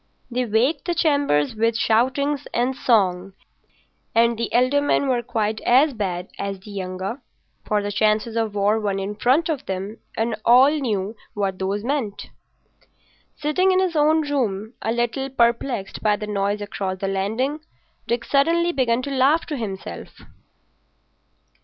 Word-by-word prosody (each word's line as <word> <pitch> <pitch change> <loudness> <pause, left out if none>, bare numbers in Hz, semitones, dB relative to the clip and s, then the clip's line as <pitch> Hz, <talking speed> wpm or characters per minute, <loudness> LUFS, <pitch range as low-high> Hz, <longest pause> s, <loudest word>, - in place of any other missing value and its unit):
They 250 +1 0
waked 235 +8 +1
the 345 -1 -1
chambers 285 - +2
with 225 +1 +1
shoutings 260 +6 +1
and 250 +2 +1
song; 195 -7 +1 0.8
and 235 +1 +4
the 230 0 -3
elder 255 +4 +3
men 285 -1 +1
were 250 -2 +1
quite 215 -2 -2
as 270 +4 +4
bad 185 -5 -3
as 200 -1 -3
the 205 +2 -12
younger. 190 +5 -5 0.5
For 210 -1 +1
the 205 - -3
chances 215 +2 +1
of 225 -2 -1
war 205 +2 +2
were 200 -2 -1
in 195 +1 -3
front 260 +10 +2
of 310 -5 -3
them, 195 +3 -4 0.2
and 225 0 0
all 255 +4 +6
knew 220 -8 -2 0.2
what 195 -2 -2
those 195 +2 -2
meant. 240 -6 -3 1.1
Sitting 335 +6 +2
in 370 - +3
his 370 -3 0
own 305 0 +3
room 220 -6 -1
a 225 - -1
little 240 +3 -1
perplexed 235 -4 0
by 210 -1 +3
the 210 - -5
noise 205 0 -1
across 195 -2 -4
the 195 - -3
landing, 220 +10 -1 0.5
Dick 235 0 -1
suddenly 335 +5 +2
began 255 -5 +1
to 280 - -4
laugh 275 +5 +3
to 305 - -4
himself. 205 -7 -6
230 Hz, 155 wpm, -22 LUFS, 205-275 Hz, 1.1 s, all